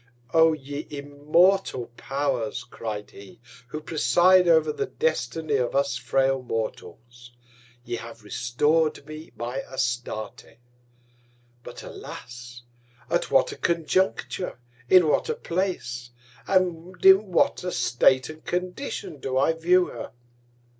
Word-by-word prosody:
O 160 0 +6
ye 145 0 -6
immortal 145 +1 +1
Powers, 135 -5 -2
cried 110 -4 -6
he, 100 +3 -14 0.3
who 150 +5 -5
preside 175 +3 +4
over 160 -2 +4
the - - -2
Destiny 155 0 -1
of 125 -1 -1
us 140 -1 +1
frail 135 0 +1
Mortals! 120 +1 -6 0.5
Ye 120 0 -3
have 115 -1 -10
restor'd 145 +9 0
me 155 +1 -10
my 120 +3 -4
Astarte; 120 -4 -4 1.0
but - - -10
alas! 120 0 -10 0.5
at - - +1
what - - +3
a - - -7
Conjuncture, 170 0 -1 0.3
in 180 -3 +7
what 150 - +1
a 460 - 0
Place, 130 - -3 0.4
and 180 -2 0
in 195 +2 +8
what 175 - +2
a 180 - -2
State 125 +1 +3
and 155 0 -11
Condition 180 - -4
do 130 -1 -2
I 140 +5 +3
view 175 +3 +3
her? 115 -5 -8
145 Hz, 120 wpm, -25 LUFS, 120-165 Hz, 1.0 s, in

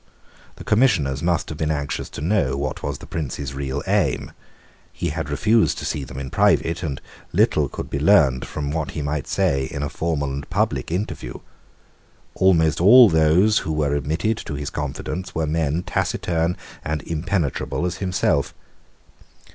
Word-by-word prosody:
The - - -10
Commissioners 80 - +2
must 85 -1 0
have 75 - -7
been 80 - 0
anxious 75 -2 -2
to - - -8
know 80 -6 +1
what 70 -1 -3
was - - -3
the - - -11
Prince's 70 -3 -4
real 70 0 -3
aim. - - 0 0.6
He 85 - -3
had 80 -1 -4
refused 110 +10 +2
to - - -5
see 75 - -2
them 65 0 -9
in 65 -1 -5
private; 85 +1 +2
and 75 -6 -3 0.3
little - - +2
could - - -6
be 70 - -3
learned 70 -7 +4
from 70 0 -4
what 75 -2 -2
he 75 - -2
might 75 -1 -2
say 70 -1 +1
in 70 -1 -5
a 70 - -2
formal 70 -4 -2
and 70 +1 -6
public - - 0
interview. 85 - -3 1.0
Almost 85 -4 +3
all 120 +5 +9
those 85 +7 +4
who 80 - -3
were 75 -2 0
admitted 80 - 0
to 70 - -5
his 70 -1 -4
confidence 90 +5 -4
were 80 -1 0
men 80 +1 0
taciturn 85 -1 -1 0.3
and 75 0 -3
impenetrable 85 -1 -2
as 90 +1 -2
himself. 90 -7 0
75 Hz, 165 wpm, -22 LUFS, 70-85 Hz, 1.0 s, all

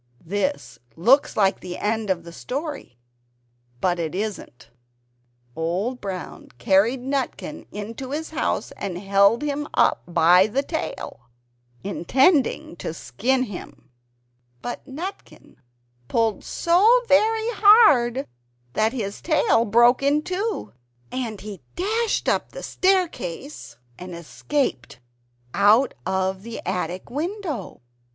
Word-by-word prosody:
This 205 - -2 0.2
looks 250 - +3
like 195 -2 +3
the 180 -1 -7
end 220 0 -1
of 175 -3 0
the 170 - -10
story; 280 - -6 0.8
but 180 +3 0
it 165 0 -3
isn't. 185 - -5 0.8
Old 185 +10 -2
Brown 185 -4 -6
carried 200 - +3
Nutkin 275 +3 -4
into 225 +5 -6
his 315 +3 -4
house, - - -1
and 190 -3 -4
held 200 +5 +3
him 295 0 -2
up - - +3
by 175 +3 +5
the 265 +6 -1
tail, 280 - -5 0.5
intending 260 - +2
to 165 - -5
skin 255 +9 0
him; 205 - -9 0.7
but 240 - -5
Nutkin 330 +9 -8 0.5
pulled 225 -3 0
so 425 +9 +4
very 440 +9 +3
hard 350 - +5 0.5
that 220 +2 +1
his 205 -6 -4
tail 305 -7 +2
broke 240 +4 +5
in 290 +2 +2
two, 395 +5 -3 0.4
and 230 -5 -4
he 205 -4 -8
dashed 440 +5 0
up - - 0
the - - -8
staircase, 300 - -1 0.2
and 180 -1 -8
escaped 170 - -3 0.5
out 220 +6 +4
of 190 0 -1
the 230 +2 -7
attic 180 +2 -3
window. 315 - -4
235 Hz, 115 wpm, -23 LUFS, 190-295 Hz, 0.8 s, by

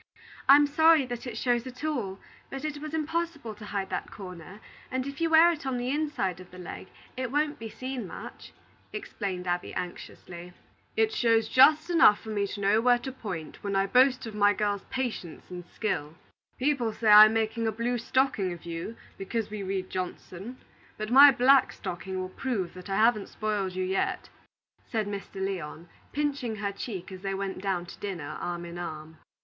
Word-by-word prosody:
"I'm 290 +1 +9
sorry 315 0 +5
that 245 0 -6
it 230 -2 -5
shows 240 +1 0
at 255 +2 -10
all; 235 -12 -2 0.3
but 270 +2 -6
it 300 -1 -3
was 310 +1 -5
impossible 320 -6 -2
to 210 0 -11
hide 200 -2 -3
that - - -3
corner, 180 0 -10 0.3
and 260 0 -2
if 280 +3 -7
you 330 - +2
wear 325 +2 +7
it 325 - -5
on 265 -2 -2
the 245 +1 -2
inside 290 - -1
of 185 - -12
the 180 - -13
leg, 180 +1 -8 0.3
it 255 -2 -3
won't 295 +1 0
be 225 0 -6
seen 255 -3 -5
much," - - -10 0.4
explained 200 - -4
Abby, 175 0 -2
anxiously. 175 0 -7 0.4
"It 440 0 +3
shows 230 - +3
just 305 +6 +5
enough 325 -11 +6
for 220 - -10
me 205 -2 0
to 205 - -6
know 205 +3 +3
where 245 0 +5
to 265 +2 -6
point 190 -11 -7
when 200 -1 -2
I 195 0 +3
boast 255 +4 +4
of 225 - -7
my 205 -1 +4
girl's 205 -2 -1
patience 240 -12 -4
and 175 -1 -7
skill. 160 -9 -3 0.4
People 255 -4 +1
say 225 - -3
I'm 215 +1 +10
making 225 +1 0
a - - +1
blue 235 +3 -1
stocking 235 -6 +1
of 170 -1 -9
you, 170 +6 -5 0.2
because 210 +2 -3
we 210 -1 -4
read 190 -1 -3
Johnson; 185 +5 -6 0.4
but 215 +1 -4
my 280 +3 +10
black 265 +1 +5
stocking 185 0 -5
will 185 0 -4
prove 200 -4 -3
that 180 +1 -10
I 195 - 0
haven't 215 -1 +3
spoiled 210 -3 -2
you 185 0 -2
yet," 190 +1 -1 0.6
said 220 -4 -1
Mr. 200 -1 -6
Lyon, 175 -4 -4 0.2
pinching 285 -6 -1
her 200 -1 -2
cheek, 195 -2 -6
as 185 -1 -9
they 195 0 -2
went 195 -1 -4
down 190 -3 -1
to - - -12
dinner 175 -8 -5
arm 175 0 -4
in 170 0 -7
arm. 160 -2 -7
215 Hz, 190 wpm, -28 LUFS, 190-260 Hz, 0.6 s, I'm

